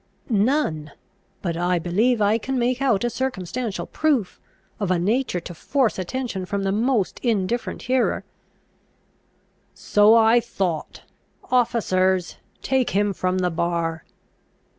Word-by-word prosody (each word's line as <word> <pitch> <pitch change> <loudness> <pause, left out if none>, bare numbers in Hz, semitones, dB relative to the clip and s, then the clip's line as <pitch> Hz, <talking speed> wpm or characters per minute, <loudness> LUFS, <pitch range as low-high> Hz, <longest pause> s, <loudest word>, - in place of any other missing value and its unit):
"None. 200 - +1 0.5
But 170 -3 -1
I 175 +1 +1
believe 210 +7 +1
I 210 +3 +3
can 265 +4 -3
make 250 +1 0
out 240 -7 +2
a 240 - +1
circumstantial 225 -6 -3
proof, 280 -11 -1 0.4
of 200 -4 -1
a 185 - +2
nature 210 +2 0
to 175 - -8
force 250 - 0
attention 190 -1 -4
from 200 0 -2
the 195 - 0
most 220 -1 0
indifferent 230 0 -1
hearer." 255 0 +1 1.5
"So 210 +2 +4
I 225 +1 +5
thought. 190 -8 -3 0.5
Officers, 190 -7 +1 0.3
take 265 -2 +1
him 205 -1 +2
from 185 0 -1
the 180 -1 0
bar!" 165 -1 -2
205 Hz, 125 wpm, -23 LUFS, 180-245 Hz, 1.5 s, I